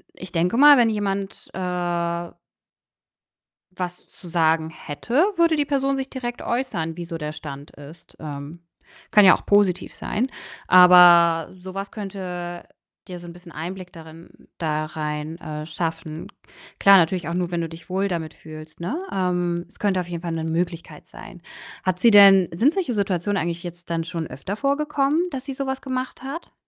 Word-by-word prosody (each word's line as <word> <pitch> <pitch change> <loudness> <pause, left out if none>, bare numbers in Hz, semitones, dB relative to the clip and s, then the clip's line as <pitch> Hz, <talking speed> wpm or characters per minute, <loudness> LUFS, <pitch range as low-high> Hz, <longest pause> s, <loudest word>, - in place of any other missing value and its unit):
ich 185 -2 -10
denke 180 +7 +1
mal, 290 0 +8
wenn 235 -2 +4
jemand, 200 -2 -3
äh 175 -2 -2 1.4
was 180 -1 -6
zu 180 - -15
sagen 160 -1 +1
hätte, 155 +9 -7 0.2
würde 335 -1 +4
die 290 - +1
Person 275 -1 0
sich 265 0 -4
direkt 240 -2 -5
äußern, 175 -10 -2
wie 175 - -5
so 165 -1 -6
der 150 -1 -4
Stand 145 -2 -9
ist. 145 +4 -14
Ähm, 145 +2 -8 0.5
kann 210 -1 +7
ja 185 - +9
auch - - -16
positiv 200 -3 +2
sein, 235 +5 -2 0.4
aber 175 -2 +7
so 185 0 -10
was 195 +1 -5
könnte 180 -4 -6 0.4
dir 180 -1 -8
so 175 - -11
'n - - -8
bisschen 175 -1 -14
Einblick 180 +3 -7
darin 165 0 -14
da 155 -2 -1
rein, 155 +1 -5
äh, 150 -1 -6
schaffen. 160 -1 -4 0.5
Klar, 200 0 +8
natürlich 170 -1 +1
auch 170 - -3
nur, 180 -1 -1
wenn 170 - -1
du 165 - -3
dich 165 +1 -13
wohl 195 +2 0
damit 160 -3 -4
fühlst, 155 0 -12
ne? 240 - -3
Ähm, 175 -2 -1
es - - -20
könnte 195 -3 +1
auf 175 - -6
jeden 170 -1 -5
Fall 170 -2 -3
'ne 160 -1 -3
Möglichkeit 170 +1 -4
sein. - - -12 0.4
Hat 185 -1 -1
sie 235 - +6
denn 195 -3 +8
sind 245 - +3
solche 355 -10 -2
Situationen 200 -1 -1
eigentlich 170 +1 -3
jetzt 175 -1 -9
dann 165 -1 0
schon 165 -1 -4
öfter 140 +11 -6
vorgekommen, 285 +3 +1
dass 265 -1 -6
sie 275 - -5
so 275 +1 -4
was 265 0 -3
gemacht 260 -1 -5
hat? 295 +6 -7
180 Hz, 180 wpm, -23 LUFS, 165-205 Hz, 1.4 s, ja